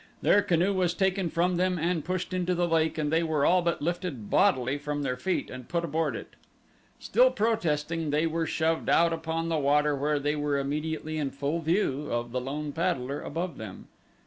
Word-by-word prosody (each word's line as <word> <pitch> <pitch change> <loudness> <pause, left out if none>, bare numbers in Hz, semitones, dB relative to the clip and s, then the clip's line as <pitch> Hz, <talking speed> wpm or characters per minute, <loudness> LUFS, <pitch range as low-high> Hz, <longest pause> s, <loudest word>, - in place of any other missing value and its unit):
Their 205 - +5
canoe 180 +2 +2
was 180 -2 +1
taken 190 -1 +1
from 175 +2 +1
them 180 0 +1
and 165 -1 0
pushed 185 +1 -3
into 180 0 0
the 175 0 +1
lake 160 -1 +1
and 150 0 -1
they 165 - +4
were 155 -3 +1
all 180 0 +4
but 170 -3 -1
lifted 170 - -3
bodily 130 +2 +3
from 145 0 -3
their 125 -2 -1
feet 180 +9 -2
and 130 -1 -9
put 170 0 0
aboard 160 +1 -1
it. - - -7 0.7
Still - - +4
protesting 165 - 0
they 150 +3 +2
were 165 0 -1
shoved 160 0 0
out 170 0 +4
upon 165 0 -2
the 160 -2 +1
water 145 +1 +3
where 145 +2 0
they 145 +1 0
were 145 -1 0
immediately 155 +2 -2
in 145 -2 -1
full 140 +4 -2
view 155 -4 0
of 120 0 -2
the 125 +1 -2
lone 145 +3 -4
paddler 145 -5 -1
above 170 +3 -4
them. 110 -4 -9
160 Hz, 200 wpm, -28 LUFS, 145-175 Hz, 0.7 s, Their